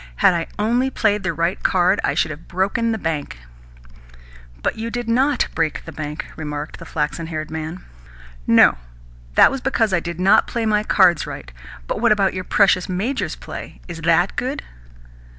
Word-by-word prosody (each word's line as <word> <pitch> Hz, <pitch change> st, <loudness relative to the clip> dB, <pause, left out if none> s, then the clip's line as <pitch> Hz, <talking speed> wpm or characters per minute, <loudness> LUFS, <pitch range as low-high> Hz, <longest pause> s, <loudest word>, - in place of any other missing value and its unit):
Had 180 Hz, -, +4 dB
I 170 Hz, -1 st, -2 dB
only 240 Hz, +5 st, +1 dB
played 210 Hz, -5 st, +1 dB
the 190 Hz, -2 st, -1 dB
right 170 Hz, +3 st, -1 dB
card, 185 Hz, +2 st, +3 dB
I -, -, 0 dB
should 155 Hz, -, +1 dB
have 155 Hz, +2 st, -10 dB
broken 200 Hz, +6 st, 0 dB
the 220 Hz, -, -1 dB
bank." 160 Hz, -, -3 dB, 1.3 s
"But -, -, 0 dB
you 225 Hz, +1 st, -4 dB
did 240 Hz, 0 st, -4 dB
NOT 265 Hz, +5 st, +2 dB
break 160 Hz, -2 st, -1 dB
the -, -, -8 dB
bank," 150 Hz, -1 st, -5 dB
remarked 150 Hz, -1 st, -6 dB
the -, -, -10 dB
flaxen 155 Hz, +2 st, -2 dB
haired 155 Hz, -1 st, -5 dB
man. 160 Hz, +3 st, -5 dB, 0.6 s
"No. -, -, +6 dB, 0.6 s
That -, -, +7 dB
was 270 Hz, -1 st, -4 dB
because 225 Hz, -6 st, +1 dB
I 180 Hz, -, +3 dB
did 170 Hz, 0 st, -6 dB
not 190 Hz, +2 st, +4 dB
play 235 Hz, -1 st, -2 dB
my 210 Hz, -1 st, +2 dB
cards 185 Hz, -6 st, +3 dB
right. -, -, -8 dB, 0.3 s
But -, -, -3 dB
what -, -, +4 dB
about 200 Hz, -2 st, +3 dB
your 185 Hz, 0 st, -4 dB
precious 185 Hz, -3 st, +3 dB
major's 210 Hz, +10 st, -2 dB
play? -, -, -9 dB
Is 170 Hz, -2 st, -7 dB
THAT 170 Hz, +3 st, +2 dB
good?" 265 Hz, +3 st, -2 dB
185 Hz, 180 wpm, -21 LUFS, 160-220 Hz, 1.3 s, That